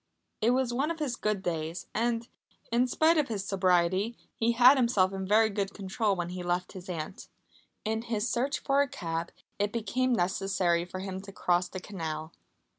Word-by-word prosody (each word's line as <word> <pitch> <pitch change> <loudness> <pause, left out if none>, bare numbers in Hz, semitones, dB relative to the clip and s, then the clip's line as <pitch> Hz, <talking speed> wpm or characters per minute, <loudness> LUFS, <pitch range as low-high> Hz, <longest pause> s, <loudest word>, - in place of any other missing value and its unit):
It 220 - +4
was 250 -1 +2
one 275 +5 0
of 335 - -2
his 290 -6 -2
good 210 -4 -1
days 165 0 -3
and, 230 +1 0 0.4
in 240 +2 +3
spite 315 +5 +4
of 295 - +1
his 205 -4 -3
sobriety, 190 +3 +2 0.2
he 230 +1 +1
had 250 +4 +8
himself 235 -7 +3
in 190 -1 -4
very 220 +2 +4
good 200 -1 -2
control 200 +1 0
when 175 -1 -3
he 180 0 -5
left 175 +1 -1
his 185 -1 -10
aunt. 165 +1 -5 0.6
In 220 +1 0
his 230 -1 -1
search 265 +5 0
for 275 0 +2
a 285 - +2
cab 165 -6 -4 0.3
it 205 0 +1
became 255 +3 0
necessary 185 -3 +1
for 185 +1 -6
him 190 -1 -5
to 200 0 -10
cross 180 -1 +1
the 185 - -6
canal. 160 -5 -5
200 Hz, 190 wpm, -29 LUFS, 180-235 Hz, 0.6 s, had